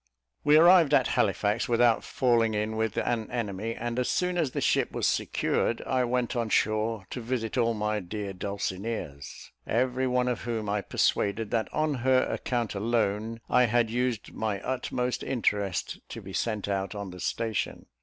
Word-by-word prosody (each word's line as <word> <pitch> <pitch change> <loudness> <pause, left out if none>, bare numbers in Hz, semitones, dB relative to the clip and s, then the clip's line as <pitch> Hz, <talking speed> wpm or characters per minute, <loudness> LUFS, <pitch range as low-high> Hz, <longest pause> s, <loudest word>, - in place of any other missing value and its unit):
We 150 +1 +6
arrived 170 -3 +7
at 130 -3 +3
Halifax 105 +3 +1
without 120 -1 +3
falling 115 -4 +2
in 105 +1 -1
with 110 -1 -1
an 115 -2 -1
enemy; 115 -1 -3
and 120 +1 -3
as 125 -1 0
soon 180 0 0
as 165 -5 +1
the - - -3
ship - - +2
was - - -1
secured, 115 - 0
I 130 -1 +1
went 125 0 -1
on 115 -2 -1
shore 110 -1 +1
to 125 - -4
visit 115 -1 -2
all 115 -2 +2
my 105 0 -1
dear 100 +1 -5
Dulcineas, 95 -5 -5 0.2
every 130 +3 +1
one 125 0 +1
of 125 -2 -1
whom 115 -2 -3
I 105 0 0
persuaded, 100 +2 0
that 115 -2 0
on 155 -1 0
her 130 0 +3
account 120 -3 -2
alone 110 +1 -1
I 125 0 +4
had 115 0 +2
used 125 -2 -1
my 105 -3 -2
utmost 125 0 -2
interest 105 -7 -1
to - - -6
be - - -10
sent 105 -4 -1
out 100 0 -2
on 100 -2 -5
the 90 - -10
station. 110 +4 -2
115 Hz, 175 wpm, -28 LUFS, 105-125 Hz, 0.2 s, arrived